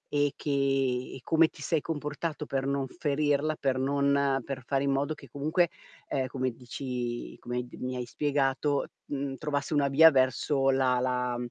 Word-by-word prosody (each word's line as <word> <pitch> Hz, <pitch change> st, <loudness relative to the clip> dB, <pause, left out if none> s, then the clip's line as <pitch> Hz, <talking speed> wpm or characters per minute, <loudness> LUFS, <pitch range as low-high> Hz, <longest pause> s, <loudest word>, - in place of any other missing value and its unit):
E 145 Hz, -1 st, +2 dB
che 145 Hz, -, -3 dB
e 135 Hz, -2 st, 0 dB
come 165 Hz, 0 st, +4 dB
ti 145 Hz, -, -11 dB
sei 155 Hz, +1 st, +1 dB
comportato 150 Hz, 0 st, -4 dB
per 135 Hz, -1 st, -2 dB
non 140 Hz, -1 st, 0 dB
ferirla, 150 Hz, 0 st, 0 dB
per 135 Hz, -3 st, 0 dB
non 140 Hz, +1 st, +2 dB
uhm, 140 Hz, -1 st, +2 dB
per 135 Hz, -2 st, -4 dB
fare 135 Hz, +2 st, 0 dB
in 140 Hz, -, +1 dB
modo 140 Hz, +3 st, 0 dB
che 140 Hz, -, -14 dB
comunque, 155 Hz, +7 st, +1 dB, 0.4 s
ehm, 130 Hz, -1 st, -1 dB
come 130 Hz, -1 st, -2 dB
dici 120 Hz, 0 st, -5 dB
come 125 Hz, 0 st, -3 dB
d -, -, -12 dB
mi 130 Hz, 0 st, -3 dB
hai 125 Hz, -, -3 dB
spiegato, 140 Hz, +1 st, 0 dB, 0.2 s
uhm, 140 Hz, -1 st, -3 dB
trovasse 145 Hz, 0 st, -2 dB
una 145 Hz, -2 st, +3 dB
via 160 Hz, +4 st, +8 dB
verso 135 Hz, +1 st, +2 dB
la 130 Hz, -2 st, +3 dB
la 125 Hz, -1 st, 0 dB
140 Hz, 175 wpm, -29 LUFS, 130-145 Hz, 0.4 s, via